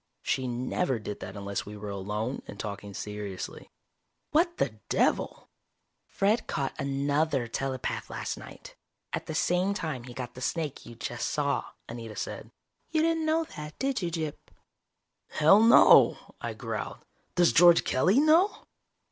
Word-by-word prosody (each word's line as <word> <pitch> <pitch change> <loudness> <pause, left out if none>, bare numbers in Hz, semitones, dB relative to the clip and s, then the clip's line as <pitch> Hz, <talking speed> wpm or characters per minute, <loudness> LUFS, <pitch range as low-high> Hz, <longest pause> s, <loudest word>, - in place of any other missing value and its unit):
She 130 -1 0
never 125 +4 -1
did 105 -2 -6
that 95 +2 -7
unless 100 0 -3
we 105 +1 -9
were 105 0 -6
alone 105 +6 -3
and 100 - -9
talking 100 -1 -5
seriously. 105 -1 -6 0.6
"What 340 +3 +2
the - - -1
devil!" - - 0 0.6
"Fred 210 +4 +1
caught 135 -1 -2
another 140 -1 0
telepath 130 +2 -3
last - - -4
night, - - -12 0.4
at - - -3
the 155 - -4
same 180 +4 +1
time 155 - -4
he 125 -1 -10
got 125 -1 -6
the 125 - -10
snake 155 +1 -3
you 120 - -10
just 120 +1 -3
saw," 140 -1 0 0.2
Anita 115 -2 -7
said. - - -5 0.4
"You 315 -1 +2
didn't 325 -1 +1
know 320 +1 +2
that, 150 -2 -8
did 270 -4 -1
you, 175 - -1
Gyp?" 160 -3 -3 0.9
"Hell, 160 +8 +5
no," 230 +1 +7 0.2
I - - -4
growled. - - -5 0.3
"Does 175 -1 +4
George 175 -1 +7
Kelly 185 - +3
know?" 320 +7 +4
140 Hz, 150 wpm, -28 LUFS, 115-180 Hz, 0.9 s, no